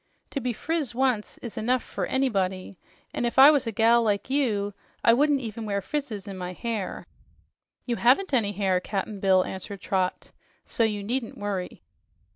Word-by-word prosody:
To 280 - -2
be 250 0 -1
friz 290 +1 -2
once 250 -5 0
is 235 - -5
enough 245 +3 +1
fer - - -4
anybody, 195 -8 -1 0.3
an' - - -2
if 240 +1 -1
I 275 +3 +10
was 285 -5 +1
a - - -1
gal 230 +2 +4
like 210 +2 -1
you, 210 -8 0 0.3
I 230 - +6
wouldn't 285 +2 +3
even 225 -1 -5
wear 200 -2 -1
frizzes 215 -2 -4
on 195 -1 -6
my 180 0 -4
hair." 220 -2 -4 0.8
"You 240 -2 -1
haven't 275 +9 +3
any 210 -5 +2
hair, 190 -2 +1
Cap'n 200 +2 -4
Bill," 190 -1 +4
answered 190 +1 -7
Trot, 185 -2 -1 0.3
"so 230 - 0
you 210 -2 0
needn't 235 +2 -3
worry." 200 -3 -4
220 Hz, 175 wpm, -26 LUFS, 200-255 Hz, 0.8 s, I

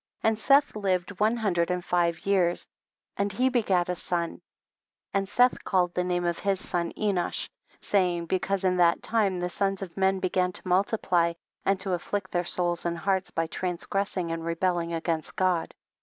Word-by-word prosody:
2. 220 - +5
And 220 -1 -2
Seth 280 +2 +4
lived 190 -2 -1
one 220 +3 +3
hundred 180 -6 +1
and 180 -1 -2
five 170 -2 0
years, 185 -3 +2 0.5
and 200 0 0
he 255 +5 +2
begat 200 -8 +2
a 180 - 0
son; 170 -1 -3 0.7
and 195 -1 0
Seth 245 +4 +3
called 180 -2 +1
the 180 - 0
name 175 -1 -1
of 170 -1 -1
his 195 -2 0
son 170 -2 -2
Enosh, 200 -4 -1 0.3
saying, 180 -4 +1
because 190 +2 -1
in 185 -1 +2
that 170 -1 +3
time 205 -5 +1
the 175 - -1
sons 195 +1 -1
of 175 -3 -9
men 190 0 +2
began 185 0 +1
to - - -7
multiply, 180 -2 +2 0.3
and 195 -1 +2
to 190 -1 -1
afflict 185 +2 -3
their 175 0 +1
souls 175 -1 0
and 170 0 -1
hearts 190 -1 0
by 165 - -1
transgressing 180 +1 -2
and 165 0 -3
rebelling 170 0 0
against 165 -1 -2
God. 185 -3 +1
185 Hz, 180 wpm, -27 LUFS, 175-195 Hz, 0.7 s, 2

